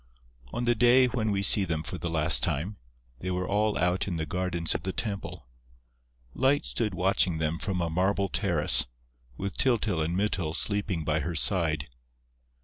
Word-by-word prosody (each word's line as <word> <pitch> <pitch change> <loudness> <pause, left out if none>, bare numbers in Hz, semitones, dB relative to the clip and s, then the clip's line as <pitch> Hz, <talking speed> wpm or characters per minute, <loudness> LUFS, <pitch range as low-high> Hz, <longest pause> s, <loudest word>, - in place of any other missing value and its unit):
On 120 - -3
the 120 - +3
day 120 +3 +5
when 120 -3 -1
we 100 -1 0
see 100 +1 +4
them 80 -4 -2
for 90 +2 -6
the 85 - -3
last 80 -5 +4
time, 95 +9 0 0.4
they 95 - -5
were 90 0 -2
all 105 +1 +1
out 90 +2 +1
in 90 - -3
the 80 -1 -2
gardens 90 -1 -1
of - - -3
the 95 - -3
temple. 100 - -4 0.9
Light 135 +3 +1
stood 105 -5 -1
watching 90 -1 +2
them 80 +1 -2
from 95 -3 -2
a 85 - -1
marble 95 +3 +1
terrace, 90 - +1 0.5
with 100 -1 -5
Tyltyl 110 -9 +1
and 85 +3 -1
Mytyl 90 -6 -1
sleeping 100 -5 0
by 75 0 0
her 85 +3 -4
side. 80 -4 +1
90 Hz, 175 wpm, -27 LUFS, 80-105 Hz, 0.9 s, day